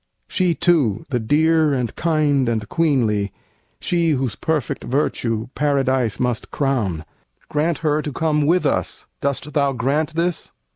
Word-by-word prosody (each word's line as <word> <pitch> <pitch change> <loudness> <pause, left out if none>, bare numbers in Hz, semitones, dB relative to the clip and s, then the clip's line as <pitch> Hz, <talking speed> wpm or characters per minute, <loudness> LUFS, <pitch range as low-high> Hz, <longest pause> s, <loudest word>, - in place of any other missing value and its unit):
She, 180 -3 +1
too, 150 - +2
the 125 - +1
dear 155 +5 +3
and 125 -3 -2
kind 150 -6 +1
and 110 -2 -2
queenly, 115 - +1 0.5
she 170 -2 +1
Whose 130 -5 -1
perfect 150 -2 -2
virtue 120 -4 -1
Paradise 130 -5 +1
must 125 -3 -1
crown, 110 - -1 0.4
Grant 155 +2 0
her 150 0 +2
to 150 - -4
come 150 0 +1
with 180 +3 +3
us! - - -1 0.2
Dost 140 +1 -2
thou 140 -2 +2
grant 140 +6 -1
this?" 170 0 -1
140 Hz, 140 wpm, -21 LUFS, 125-155 Hz, 0.5 s, dear